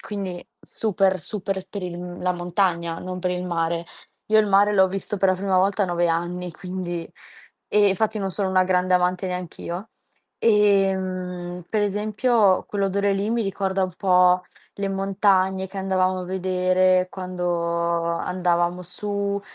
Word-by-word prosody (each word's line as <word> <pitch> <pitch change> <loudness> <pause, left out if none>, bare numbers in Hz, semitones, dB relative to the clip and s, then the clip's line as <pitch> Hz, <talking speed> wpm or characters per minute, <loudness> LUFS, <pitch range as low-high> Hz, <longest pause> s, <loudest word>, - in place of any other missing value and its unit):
quindi 195 -4 -6
super, 195 -3 0
super 190 +2 -4
per 200 -1 -6
il 175 0 -6
la 180 - +1
montagna, 175 -1 -1
non 185 0 -5
per 180 0 -1
il 180 0 -3
mare. 170 -1 -1 0.4
Io 220 0 +4
il 215 - +4
mare 200 +1 +4
l'ho 190 -2 +5
visto 195 +2 -3
per 195 -1 +3
la - - +2
prima 190 0 +1
volta 195 +2 +2
a 190 - +1
9 175 0 +1
anni, 175 +1 -2
quindi 180 -2 -5 0.6
e 205 -1 +4
infatti 215 +2 0
non 195 -1 -2
sono 195 +1 -1
una 185 0 +3
grande 185 0 +2
amante 180 +1 +1
neanch'io. 180 +2 -5 0.5
Ehm, 185 -4 +1
per 215 -1 0
esempio, 210 0 +2
quell'odore 200 0 0
lì 200 +3 -1
mi 235 -1 +1
ricorda 195 -1 -1
un 185 - -5
po' 180 -1 +4 0.3
le 200 0 -2
montagne 195 -1 +1
che 195 - -7
andavamo 185 -1 +1
a 180 - -5
vedere 185 0 +2
quando 180 -1 -5 0.6
andavamo 175 +1 0
su, 200 +3 -2
185 Hz, 155 wpm, -23 LUFS, 180-200 Hz, 0.6 s, l'ho